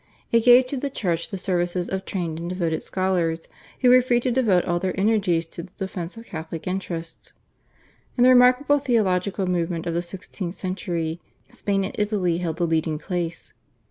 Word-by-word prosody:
It 230 0 +3
gave 250 +1 +8
to 270 +2 -4
the 280 +2 -2
Church 175 -10 -2
the 195 - -4
services 175 -1 -1
of 190 0 -3
trained 170 -4 -3
and 170 +1 -4
devoted 170 -3 -1
scholars, 175 -3 -1 0.3
who 250 - +5
were 255 0 +8
free 245 -1 +2
to 255 - 0
devote 220 -8 +3
all 175 0 0
their 190 +1 -2
energies 195 -5 +2
to - - -6
the 180 +2 -13
defence 190 -1 -5
of 230 - -10
Catholic 160 -2 -7
interests. 175 -3 -5 0.8
In 245 - +4
the 255 - +7
remarkable 255 +3 +5
theological 200 -6 +1
movement 170 -2 -1
of 170 - -2
the 170 - 0
sixteenth 180 0 -7
century 175 -4 -3 0.3
Spain 195 -1 -1
and 190 - -4
Italy 195 -5 0
held 165 -3 -3
the 175 - +1
leading 160 -1 0
place. 170 0 -4
185 Hz, 180 wpm, -24 LUFS, 170-210 Hz, 0.8 s, gave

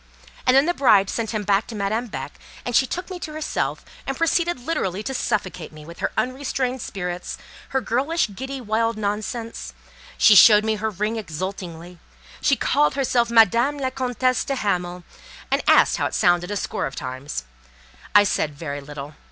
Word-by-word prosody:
And 255 +1 +6
then 275 - +5
the 350 - +1
bride 210 - +4
sent 225 -2 -2
him 215 -2 -2
back 200 +2 +1
to 230 - -7
Madame 215 +4 -1
Beck, - - -7 0.3
and 245 - -2
she 265 - +4
took 360 +6 -5
me 360 - -5
to 310 - -6
herself, 310 0 -3 0.2
and 270 - -2
proceeded 335 -2 +1
literally 215 - -2
to 265 - -3
suffocate 190 -9 -2
me 155 -1 -12
with 170 +1 -11
her - - -1
unrestrained 255 -1 -1
spirits, 180 -4 -5 0.3
her 265 - 0
girlish, 265 +2 0
giddy, 265 +6 -5
wild 225 -1 0
nonsense. 215 +2 -4 0.4
She 220 - +7
showed 210 +1 +8
her 220 0 0
ring 210 +3 -2
exultingly; 180 -2 -6 0.4
she 280 - +3
called 290 +1 +2
herself 245 -4 +1
Madame 235 +5 +4
la 260 -2 -2
Comtesse 255 -1 0
de 275 - -2
Hamal, 180 -6 -2 0.5
and - - +2
asked - - +5
how - - 0
it - - -5
sounded, 175 0 +3
a 205 - -2
score - - -2
of 135 - -9
times. 130 - -5 0.7
I 205 - +9
said 155 -6 -1
very 145 -1 -5
little. 145 +1 -8
220 Hz, 175 wpm, -23 LUFS, 180-260 Hz, 0.7 s, I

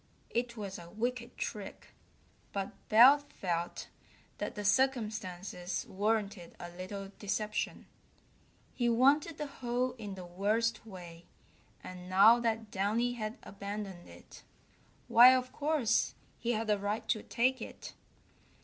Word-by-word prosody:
It 235 0 -1
was 200 -3 -5
a 170 0 -11
wicked 240 +4 -3
trick, 210 -3 -6 0.6
but 195 -1 -2 0.2
Belt 275 +6 +7
felt 170 -2 -3 0.5
that - - -3
the 205 -1 -5
circumstances 205 -6 0
warranted 205 -2 -1
a 175 - -7
little 195 +2 -7
deception. 210 +1 -2 0.9
He 240 -1 +1
wanted 280 +7 +3
the 300 - -3
hole 250 -2 -2
in 205 -3 -6
the 185 -1 -8
worst 215 +6 0
way, 175 -4 -10 0.6
and 180 0 -9
now 210 +6 +7
that 225 -2 -1
Downy 220 +5 +1
had 215 -1 -4
abandoned 200 -2 -7
it, - - -14 0.7
why, 245 +2 +9
of 255 0 -2
course, 295 -6 +1 0.2
he 240 +1 0
had 220 0 -2
a 205 - +2
right 205 +2 -2
to 215 - +1
take 255 +2 +1
it. - - -8
215 Hz, 130 wpm, -32 LUFS, 195-240 Hz, 0.9 s, why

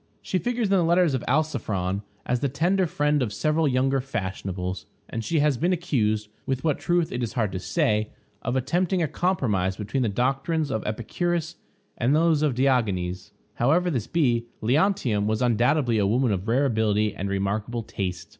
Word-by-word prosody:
She 185 - -1
figures 245 +1 -1
in 195 - -1
the 195 -2 +4
letters 170 -2 +3
of 130 - -1
Alciphron 100 -10 0 0.2
as 125 0 0
the 140 - 0
tender 175 +7 +1
friend 150 -1 +1
of 115 -5 -1
several 155 +6 +1
younger 135 0 +2
fashionables; 95 -6 -4 0.2
and 115 - -4
she 165 - 0
has 145 -4 +2
been 175 +3 +2
accused, 110 -12 0 0.2
with 130 -1 -1
what 155 -4 +1
truth 175 -1 +1
it 125 - -3
is 115 - -3
hard 110 -5 0
to 95 - -3
say, 105 +3 0 0.3
of 125 - -2
attempting 175 +7 +1
a - - +1
compromise 110 - 0
between 110 +6 -2
the 120 - +1
doctrines 135 +7 0
of 110 -3 -2
Epicurus 165 +10 -2 0.4
and 125 +4 +3
those 160 -1 +3
of 150 -5 +1
Diogenes. 105 -8 0 0.2
However 175 +9 +2
this 125 -8 -2
be, 120 -8 +1
Leontium 125 - +1
was 110 0 0
undoubtedly 120 0 +2
a 100 - +2
woman 120 +3 +2
of 95 +1 -2
rare 130 +5 +2
ability 110 -4 +1
and 100 +1 -3
remarkable 100 +4 -2
taste. 90 -4 -4
125 Hz, 180 wpm, -25 LUFS, 105-155 Hz, 0.4 s, the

